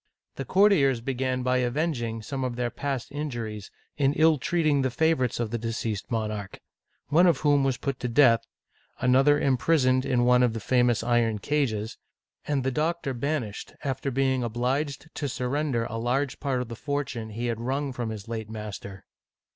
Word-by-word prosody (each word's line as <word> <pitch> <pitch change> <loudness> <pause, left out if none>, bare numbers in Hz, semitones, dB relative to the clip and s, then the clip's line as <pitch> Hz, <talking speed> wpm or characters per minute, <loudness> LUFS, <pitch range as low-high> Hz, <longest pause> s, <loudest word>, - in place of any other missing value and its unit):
The 135 - -5
courtiers 165 - +4
began 130 +1 -2
by 125 0 +2
avenging 125 -3 -1
some 135 +5 -4
of 125 -2 -2
their 120 -1 -2
past 140 -3 -4
injuries 120 -8 -5 0.3
in 140 -1 +2
ill 155 -1 +4
treating 155 -1 +1
the 130 - +1
favorites 130 -3 +1
of 115 -2 -2
the 120 - -2
de 115 +1 -3
ceased 110 -3 -3
monarch, 110 -4 -3 0.5
one 170 +5 +5
of 165 -6 +2
whom 145 -2 +3
was 135 -2 +1
put 135 -3 -3
to 125 - -2
death, 115 -2 +5 0.6
another 135 +3 +4
imprisoned 130 -1 +2
in 125 -3 +1
one 125 0 +5
of 125 -2 +3
the 115 - -3
famous 120 0 +2
iron 120 -2 +2
cages, 110 -4 -1 0.5
and 140 -3 0
the 130 - 0
doctor 155 0 -1
banished, 125 -4 -3
after 135 0 -2
being 130 0 +1
obliged 130 +6 -2
to 145 - -3
surrender 125 -1 -1
a 115 - -5
large 130 +4 -1
part 135 -3 -1
of - - -11
the 115 - -7
fortune 135 -5 -3
he 115 +3 -4
had 115 -1 -2
wrung 135 +2 -2
from 120 -2 -3
his 110 -2 -7
late 110 -2 -5
master. 105 -3 -7
125 Hz, 180 wpm, -26 LUFS, 115-140 Hz, 0.6 s, one